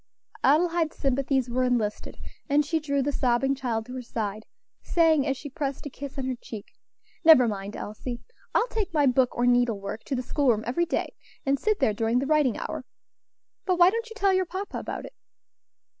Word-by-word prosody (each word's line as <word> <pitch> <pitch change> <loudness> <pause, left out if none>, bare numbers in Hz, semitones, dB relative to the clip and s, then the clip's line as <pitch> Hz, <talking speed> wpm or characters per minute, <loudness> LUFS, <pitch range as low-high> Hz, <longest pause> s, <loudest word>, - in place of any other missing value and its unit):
Adelaide's 330 +2 +2
sympathies 270 -1 0
were 250 +1 0
enlisted, 235 -4 -1 0.3
and 290 +1 +3
she 320 +2 0
drew 280 -2 0
the 290 - 0
sobbing 260 0 +1
child 240 -5 -2
to 250 - -9
her 255 - -4
side, 215 -3 -4 0.3
saying, 320 -4 +3
as 270 -1 0
she 290 - -8
pressed 275 +1 -4
a 290 - -5
kiss 280 +1 -8
on 265 - -2
her 260 - -1
cheek, 215 -3 -8 0.6
"Never 315 -7 +8
mind, 200 -1 -4
Elsie, 235 +3 -6 0.4
I - - +5
will 470 - -1
take 410 -7 -3
my 295 -2 +4
book 255 -1 +2
or 240 - +2
needle 245 -3 +3
work 200 +3 -6
to 275 - -2
the 250 - -2
school 280 +2 +1
room 220 -2 +2
every 340 +9 0
day, - - -2 0.3
and 275 0 +1
sit 430 -1 +1
there 215 - +2
during 225 +2 0
the 265 - +1
writing 295 -4 +2
hour. - - -5 0.8
But 365 -1 +2
why 350 +1 +7
don't 460 +2 -3
you 450 - -10
tell 395 -3 +2
your 375 -1 +1
papa 380 +3 -5
about - - -5
it?" - - -11
270 Hz, 205 wpm, -26 LUFS, 240-315 Hz, 0.8 s, Never